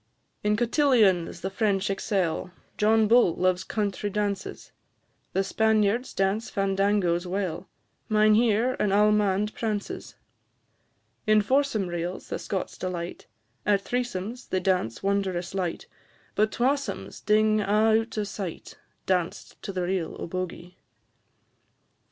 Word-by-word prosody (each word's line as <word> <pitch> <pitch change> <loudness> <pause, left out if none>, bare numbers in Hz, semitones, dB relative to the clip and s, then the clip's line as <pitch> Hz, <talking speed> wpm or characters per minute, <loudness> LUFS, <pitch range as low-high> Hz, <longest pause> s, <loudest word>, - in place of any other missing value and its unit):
In 210 0 +2
cotillions 230 - +3
the 190 - -3
French 200 -2 +1
excel, 190 -4 -1 0.3
John 220 +1 +3
Bull 230 -6 +5
loves 185 0 +1
country 205 -1 -2
dances; 205 -1 -3 0.6
The 195 - +2
Spaniards 220 +3 +1
dance 195 +4 0
fandangoes 195 -3 +1
well; 185 -1 -3 0.4
Mynheer 215 +3 +4
an 205 - +1
all'mande 210 0 +3
prances; 215 -3 -4 1.1
In 215 0 +6
foursome 260 -3 +1
reels 175 +1 -4
the - - -3
Scots 190 -2 -4
delight, 180 -2 -5 0.4
At 200 -1 +2
threesomes 240 -1 -3
they 185 - +1
dance 180 - 0
wondrous 190 -2 -1
light, 185 -3 -2 0.5
But 215 +1 +2
twasomes 275 +3 -2
ding 215 0 +3
a' 215 +2 +3
out 225 0 -9
o' 210 - +1
sight, 195 -4 -7 0.3
Danced 180 -2 -2
to 200 - -5
the 185 -2 -2
reel 180 -2 -2
o' - - -4
Bogie. 180 0 -6
200 Hz, 120 wpm, -26 LUFS, 185-215 Hz, 1.1 s, In